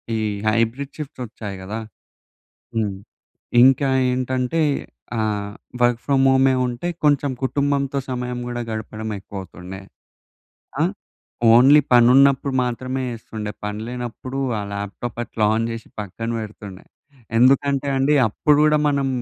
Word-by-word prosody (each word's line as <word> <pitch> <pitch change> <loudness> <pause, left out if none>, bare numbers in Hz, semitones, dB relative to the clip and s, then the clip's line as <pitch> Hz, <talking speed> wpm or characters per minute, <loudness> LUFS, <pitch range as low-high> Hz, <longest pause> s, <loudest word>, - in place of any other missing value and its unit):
ఈ - - 0 0.3
hybrid 115 +5 0
shifts 145 -4 -7
వచ్చాయి 105 -3 -7
గదా! 105 +4 -5 1.0
హ్మ్. 105 -3 0 0.7
ఇంకా 135 +1 +5 0.2
ఏంటంటే 130 +4 -1 0.6
ఆహ్, 105 -2 -1 0.3
వర్క్ 120 -1 +3
ఫ్రామ్ 135 -2 +3
హోమే 130 0 +4
ఉంటే 125 +8 -4 0.2
కొంచెం 145 -2 +3
కుటుంబంతో 140 0 0
సమయం 125 -1 -3
గూడా 120 0 -4
గడపడం 110 0 -5
ఎక్కువవుతుండే. 95 -1 -9 1.0
ఆ! - - +4 0.7
ఓన్లీ 135 +5 +7
పనున్నప్పుడు 130 +3 +5
మాత్రమే 130 +2 -3
ఎస్తుండే. 110 -1 -6
పని 105 +1 -4
లేనప్పుడు 125 +2 -6 0.2
ఆ - - -2
ల్యాప్‌టాప్ 100 +4 -5
అట్లా 110 -2 -2
ఆన్ 115 +1 0
చేసి 115 -1 -7
పక్కన 105 +3 -6
పెడుతుండే. 105 -3 -9 0.5
ఎందుకంటే 140 +2 +3
అండి 140 +3 +3
అప్పుడు 145 +7 +2
గూడా 150 0 +4
మనం 140 -1 +1
125 Hz, 120 wpm, -21 LUFS, 110-135 Hz, 1.0 s, ఓన్లీ